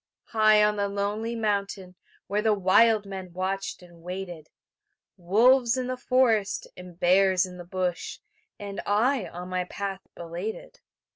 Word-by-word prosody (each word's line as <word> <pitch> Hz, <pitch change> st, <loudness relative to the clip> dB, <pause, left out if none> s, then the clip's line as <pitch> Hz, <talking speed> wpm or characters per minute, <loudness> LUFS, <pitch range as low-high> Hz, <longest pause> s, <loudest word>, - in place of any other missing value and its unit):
High 215 Hz, -1 st, +5 dB
on 210 Hz, 0 st, +2 dB
the 200 Hz, 0 st, 0 dB
lonely 205 Hz, +3 st, -2 dB
mountain 200 Hz, -4 st, -2 dB, 0.3 s
Where 205 Hz, +1 st, -1 dB
the 215 Hz, -1 st, +2 dB
wild 205 Hz, +3 st, +4 dB
men 190 Hz, -2 st, -8 dB
watched 190 Hz, +1 st, -3 dB
and 170 Hz, -1 st, -17 dB
waited; 175 Hz, -3 st, -7 dB, 0.7 s
Wolves 235 Hz, +7 st, +3 dB
in 255 Hz, -, -1 dB
the 255 Hz, +1 st, -2 dB
forest, 250 Hz, -5 st, +1 dB
and 180 Hz, -1 st, -12 dB
bears 185 Hz, +1 st, +4 dB
in 180 Hz, -1 st, -10 dB
the 175 Hz, -, -8 dB
bush, 180 Hz, -1 st, -3 dB, 0.4 s
And 200 Hz, -1 st, -6 dB
I 225 Hz, +3 st, +2 dB
on 180 Hz, +1 st, -8 dB
my 185 Hz, 0 st, -1 dB
path 195 Hz, +1 st, -5 dB
belated. 175 Hz, -, -7 dB
200 Hz, 145 wpm, -26 LUFS, 180-215 Hz, 0.7 s, High